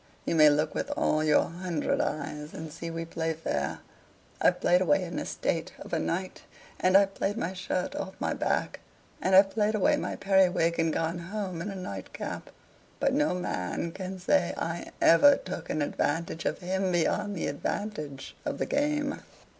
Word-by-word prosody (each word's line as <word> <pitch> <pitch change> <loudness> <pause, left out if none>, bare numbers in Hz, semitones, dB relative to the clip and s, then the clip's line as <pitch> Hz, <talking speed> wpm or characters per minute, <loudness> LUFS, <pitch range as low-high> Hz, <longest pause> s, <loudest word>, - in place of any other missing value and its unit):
you - - 0
may 155 -2 +7
look 150 +1 +1
with - - -3
all 155 0 +2
your 155 -1 +4
hundred 170 -2 -1
eyes 150 0 -4
and 160 -1 -6
see 170 - -6
we 165 0 -4
play 165 0 -2
fair. 150 - -3 0.6
I've - - +4
played 180 +1 +4
away 185 +1 +3
an 175 -1 -4
estate 165 -1 -2
of - - -10
a 165 - +2
night, 185 +4 -3 0.4
and 185 +1 +6
I've 195 0 +3
played 205 +3 -1
my 185 -4 -2
shirt 185 -1 -2
off 190 - -5
my - - 0
back; - - -1 0.4
and 190 0 +3
I've 195 +1 +7
played 215 0 +1
away 205 - +3
my - - -3
periwig 180 -4 +3
and 165 -1 +2
gone 165 +2 -1
home 185 -1 -4
in 190 - -3
a 195 - -5
nightcap. 185 0 -6 0.5
But 275 - +2
no 295 -7 +2
man 165 - -3
can 185 +1 -6
say 180 -1 +2
I 165 +1 -3
ever 280 +13 +7
took - - -7
an 155 - 0
advantage 165 +3 -1
of - - -1
him 190 +1 0
beyond 200 +4 +1
the 170 - -2
advantage 150 -4 -4
of - - -3
the - - -1
game. 290 0 0
180 Hz, 180 wpm, -28 LUFS, 165-195 Hz, 0.6 s, may